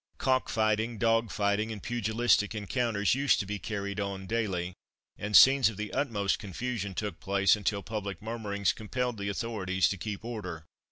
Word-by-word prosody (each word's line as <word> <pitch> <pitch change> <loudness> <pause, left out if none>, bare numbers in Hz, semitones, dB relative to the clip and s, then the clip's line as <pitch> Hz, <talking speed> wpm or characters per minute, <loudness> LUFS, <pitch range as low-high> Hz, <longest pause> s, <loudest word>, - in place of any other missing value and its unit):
Cock 130 -1 +1
fighting, 110 +1 +1
dog 115 +1 +2
fighting, 105 +2 0
and 105 -3 -7
pugilistic 115 -2 +1
encounters 105 0 0
used 135 +2 +3
to 100 - -2
be 105 +1 -4
carried 100 -1 -4
on 100 -1 -3
daily, 95 -5 -2 0.4
and 105 0 +3
scenes 135 -3 +7
of 110 - -9
the 105 0 -5
utmost 105 -8 0
confusion 105 0 -4
took 105 +1 -4
place, 100 +1 +3
until 100 -1 -2
public 100 -3 -4
murmurings 105 -6 -1
compelled 120 +1 -3
the 100 0 -2
authorities 100 -3 0
to 100 - -3
keep 105 +3 -5
order. 90 -9 -6
105 Hz, 165 wpm, -29 LUFS, 100-115 Hz, 0.4 s, scenes